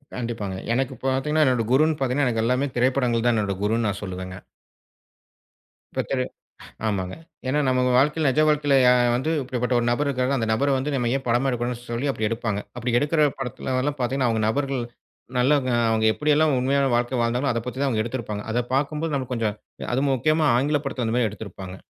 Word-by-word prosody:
கண்டிப்பாங்க. 115 -5 -4 0.2
எனக்குப் 130 +1 -2
பாத்தீங்கன்னா 135 +4 +2
என்னோட 125 -3 +2
குருன்னு 155 +4 +3
பாத்தீங்கன்னா 135 +1 +1
எனக்கு 115 -2 0
எல்லாமே 125 +4 +1
திரைப்படங்கள் 125 -2 +1
தான் 120 - +3
என்னோட 100 -3 -1
குருன்னு 110 +2 +1
நான் 100 -1 -3
சொல்லுவேங்க. 95 -1 -6 1.6
இப்ப - - 0
திற 135 -2 0 0.7
ஆமாங்க. 95 -3 -2 0.3
ஏன்னா 140 +3 +1
நம்ம 130 0 +2
வாழ்க்கைல, 150 +4 +3
நிஜ 150 - +2
வாழ்க்கையில 145 -2 +3 0.4
வந்து 130 +6 -1
இப்படிப்பட்ட 125 -1 -2
ஒரு 120 - -1
நபர் 145 +5 +1
இருக்கங்க. 130 0 0
அந்த 115 -2 -1
நபர 135 +5 +2
வந்து 140 +3 -2
நம்ம 120 -3 0
ஏன் 135 - -3
படமா 120 +3 +2
எடுக்கணும்னு 120 -1 -2
சொல்லி 120 +4 -1
அப்டி 110 -4 -1
எடுப்பாங்க. 115 -2 -2 0.2
அப்டி 120 +1 -1
எடுக்குற 150 +1 +2
படத்துலலாம் 130 +2 -2
பாத்தீங்கன்னா, 130 0 +1
அவங்க 110 -1 0
நபர்கள் 135 +1 -1 0.5
நல்லவங்க, 130 0 +2 0.2
அவங்க 110 0 +1
எப்டிலாம் 150 +1 +2
உண்மையான 140 +2 +2
வாழ்க்கை 120 +2 0
வாழ்ந்தாங்கலோ 125 +4 +1
அதப் 115 0 -3
பத்தி 125 +1 -5
தான் 120 -6 +1
எடுத்திருப்பாங்க. 110 -4 -4
அதப் 120 +1 -1
பாக்கும் 145 +3 0
போது 165 -2 -2
நமக்குக் 130 -2 -3
கொஞ்சம் 110 -3 -1 0.4
அது 130 +3 +1
முக்கியமா 155 +5 +2
ஆங்கிலப் 145 +3 0
படத்தல 130 -3 -2
அந்த 110 - -1
மாரி 120 -3 +2
எடுத்திருப்பாங்க. 95 -3 -8
125 Hz, 180 wpm, -24 LUFS, 115-140 Hz, 1.6 s, குருன்னு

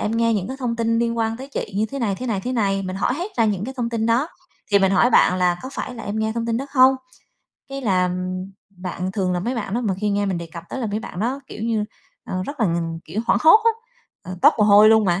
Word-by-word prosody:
em 210 - -1
nghe 230 0 +2
những 195 -1 -2
cái 265 - -5
thông 235 -2 -2
tin 230 0 +1
liên 235 0 0
quan 225 0 0
tới 265 +3 -9
chị" - - -4
như 215 +2 +1
thế 275 +5 -6
này, 215 -6 0
thế 255 +5 -6
này, 215 -5 -1
thế 250 +6 -4
này. 195 -4 0
Mình 185 0 -4
hỏi 245 - 0
hết 360 +7 -5
ra 230 - +3
những 205 -2 0
cái 265 +2 -6
thông 235 -2 -2
tin 225 -1 -1
đó, 245 +8 +2 0.4
thì 200 - +7
mình 195 0 +2
hỏi 240 +6 +4
bạn 185 - +4
là 180 -1 +2
có 260 - -6
phải 250 - -5
là 230 - -8
em 205 +1 -3
nghe 220 0 0
thông 230 0 -2
tin 230 -1 0
đó 270 - -4
không? 260 -1 +6 0.7
Cái 275 0 -5
là, 185 -5 +2
ừm, 185 +1 -4 0.2
bạn 185 0 -5
thường 190 -3 -1
là 180 - -1
mấy 245 +7 -2
bạn 210 -3 -4
đó 240 - 0
mà 210 -6 -1
khi 205 +2 -2
nghe 205 0 0
mình 185 -3 -1
đề 170 - -6
cập 170 - -8
tới 265 - -5
là 235 - -1
mấy 210 +1 -3
bạn 180 - -7
đó, 260 +5 -1
kiểu 215 - -8
như, 225 -2 0 0.4
ờ, 185 0 -3
rất 285 +5 -7
là 220 - +3
ng 165 -1 -2
kiểu, 215 - -4
hoảng - - +3
hốt 325 +8 +8
á, 460 - +6 0.5
ờ, 185 0 -8
toát - - +8
mồ 210 - +5
hôi 210 +1 +7
luôn 220 -1 +5
mà 175 0 +1
220 Hz, 300 wpm, -22 LUFS, 190-235 Hz, 0.7 s, hốt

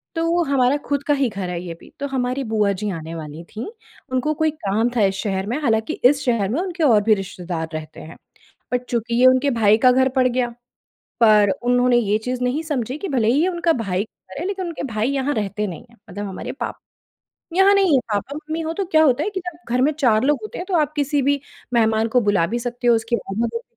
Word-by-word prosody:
तो 335 +1 +1
हमारा 270 0 +2
खुद 285 -1 -1
का 290 - +4
ही 275 -4 +1
घर 195 -3 -5
है 175 -1 -3
ये 170 -2 -6
भी। - - -16
तो 280 - -2
हमारी 260 0 -2
बुआ 210 -2 +2
जी 210 +2 -3
आने 165 -1 -6
वाली 155 +1 -8
थीं, 215 - -7 0.4
उनको 260 +4 0
कोई 315 +1 +1
काम 215 +4 +1
था 225 - +2
इस 195 0 0
शहर 195 0 -2
में। 245 +6 -1
हालाँकि 220 -5 +1
इस 285 +2 +5
शहर 230 -6 +1
में 280 +9 0
उनके 360 -3 -3
और 220 -6 +5
भी 220 0 +4
रिश्तेदार 180 -4 -5
रहते 155 0 -7
हैं। 160 - -11 0.5
पर 250 - +3
चूँकि 235 0 -1
ये - - +6
उनके 255 +2 +4
भाई 215 -2 +4
का 255 0 +6
घर 260 +1 +3
पड़ 255 -1 +4
गया, 250 0 0 0.7
पर 210 -3 +6
उन्होंने 245 0 +3
ये 210 -2 +2
चीज़ 250 +2 -4
नहीं 270 +6 0
समझी 265 -3 -3
कि 390 - -5
भले 240 -5 +1
ही 280 +6 +3
ये 360 - +2
उनके 340 -2 +1
भाई 185 0 -1
का 185 - -19
घर - - -5
है - - -3
लेकिन 385 -2 -3
उनके 330 -4 -5
भाई 215 +4 0
यहाँ 280 +1 0
रहते 210 0 -2
नहीं 170 +3 -8
हैं। 235 - -22
मतलब 205 +2 -5
हमारे 190 - -6
पाप - - -5 0.8
यहाँ 390 +2 +5
नहीं 390 -4 +3
हैं। 260 - +4
पापा-मम्मी 300 +9 -3
हों 320 +1 -3
तो 395 - -2
क्या 315 -3 +4
होता 280 +1 +3
है 420 - -2
कि 375 - -2
जब 340 -1 -6 0.2
घर 250 - +2
में 300 - +3
4 250 -7 +2
लोग 295 +1 +2
होते 430 - -7
हैं 360 - -5
तो 370 - -2
आप 300 -1 +1
किसी 290 0 +1
भी 285 +1 +1 0.3
मेहमान 220 -1 +2
को 250 +2 +3
बुला 200 -5 +2
भी 235 +5 -2
सकती 245 0 -4
हो, 235 - +6
उसकी 230 +1 -1
आवभगत 230 +4 -3
245 Hz, 240 wpm, -21 LUFS, 210-290 Hz, 0.8 s, ये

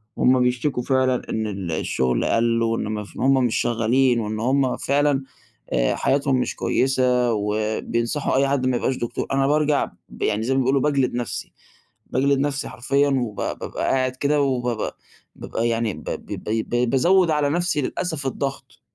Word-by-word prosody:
وهم 130 0 +4
بيشتكوا 125 +1 0
فعلًا 130 -1 +1
إن 110 -1 -1
ال 95 -4 -4
الشغل 65 -5 0
قلّ 115 0 +2
وإن 115 0 0
ما 105 -1 -3
ف 105 - -15
وإن - - -2
هم 135 -1 +4
مش 115 - 0
شغالين 120 +2 +2
وإن 110 -1 -3
هم 130 +2 +1
فعلًا 140 0 +1 0.5
آآ، - - +2
حياتهم 140 0 +1
مش - - -2
كويّسة 125 -2 +1
وبينصحوا 110 +6 -1
أي 135 +1 +3
حد 135 -2 0
ما 125 - +1
يبقاش 130 - 0
دكتور، 120 - -3
أنا 135 0 +2
بارجع 150 0 +2 0.2
ب - - -13
يعني 110 +1 0
زي 130 - 0
ما 135 - +2
بيقولوا 135 +1 +2
باجلد 140 -4 +1
نفسي، 120 -2 -4 0.6
باجلد 140 +2 +2
نفسي 140 0 -1
حرفيًا 140 +5 +1
وب 125 -6 -1
بابقى - - -4
قاعد 130 -1 +1
كده 145 +2 +1
وبابقى 125 -5 -1 0.4
بابقى 115 +1 -3
يعني 115 -2 0
ب - - -10
ب - - -5
ب - - -6
ب 110 +1 -2
بقيت 120 0 +1
بازود 170 +6 +4
على 150 -2 +1
نفسي 175 -2 0
للأسف 155 0 -3
الضغط، 135 +1 -5
130 Hz, 175 wpm, -22 LUFS, 115-140 Hz, 0.6 s, وهم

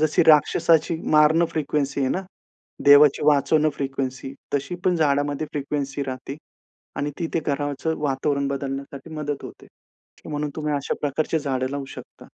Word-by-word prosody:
जशी 155 +1 +3
राक्षसाची 160 +1 +4
मारण 155 +2 +5
फ्रिक्वेन्सी 145 -2 -1
आहे 130 - +1
ना. 190 - -1 0.6
देवाची 145 0 +7
वाचवणं 150 +1 +3
फ्रिक्वेन्सी. 135 -1 -4 0.2
तशी 145 +6 -2
पण 180 -2 +3
झाडामध्ये 145 0 +1
फ्रिक्वेन्सी 140 -1 -3
राहते. 130 +2 -6 0.6
आणि 145 +1 -2
ती 170 - -1
ते 165 - +2
घराचं 145 +2 -1
वातावरण 140 0 0
बदलण्यासाठी 140 +2 -5
मदत 145 -2 -4
होते. - - -11 0.6
म्हणून 150 -1 -3
तुम्ही 150 -1 -2
अशा 140 - -2
प्रकारची 155 +3 0
झाडं 130 -3 -2
लावू 140 -1 -4
शकता. - - -12
145 Hz, 140 wpm, -23 LUFS, 140-155 Hz, 0.6 s, देवाची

